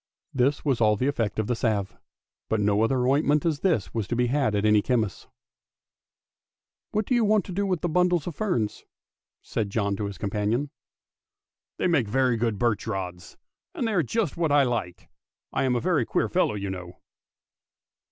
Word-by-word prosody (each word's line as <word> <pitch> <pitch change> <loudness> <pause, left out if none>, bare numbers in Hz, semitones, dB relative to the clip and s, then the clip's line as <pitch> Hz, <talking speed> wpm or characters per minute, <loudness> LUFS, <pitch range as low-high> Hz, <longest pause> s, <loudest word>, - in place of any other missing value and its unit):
This 135 +4 +1
was 135 -5 +1
all 105 -1 +4
the 125 - -1
effect 115 -7 -1
of 110 - 0
the 120 - 0
salve; 110 -4 -1 0.5
but 110 - +1
no 105 +2 +2
such - - -4
ointment 140 +4 +2
as 155 -4 +1
this 160 - 0
was 110 -4 -2
to 120 - -2
be 125 +1 +2
had 130 -3 +1
at 105 +1 0
any 105 -1 +5
chemist's. 110 -5 -1 0.8
" - - -68
Whatever 215 0 -1
do - - +3
you 240 -2 +3
want 215 -2 +2
with 195 -4 0
those 175 - -1
bundles 180 -3 +2
of 175 - -5
fern? 180 - 0 0.4
" - - -68
said 105 -3 -1
John 100 -1 0
to 105 - -2
his 100 -1 -6
companion. 105 +7 -1 0.5
" - - -67
They - - -1
make 160 - +2
very 130 +2 +2
good 115 -2 -1
birch 115 0 0
rods, 90 -3 -5 0.4
and 235 - -1
they 220 - -1
are 180 - +3
just 185 - -1
what 165 -3 +1
I 145 -1 +5
like. 115 -9 -3 0.5
I - - +1
am 125 -1 +1
a - - +1
very - - +1
queer - - +1
fellow, - - +1
you 100 -1 -3
know! 90 -1 -8
120 Hz, 195 wpm, -26 LUFS, 105-150 Hz, 0.8 s, any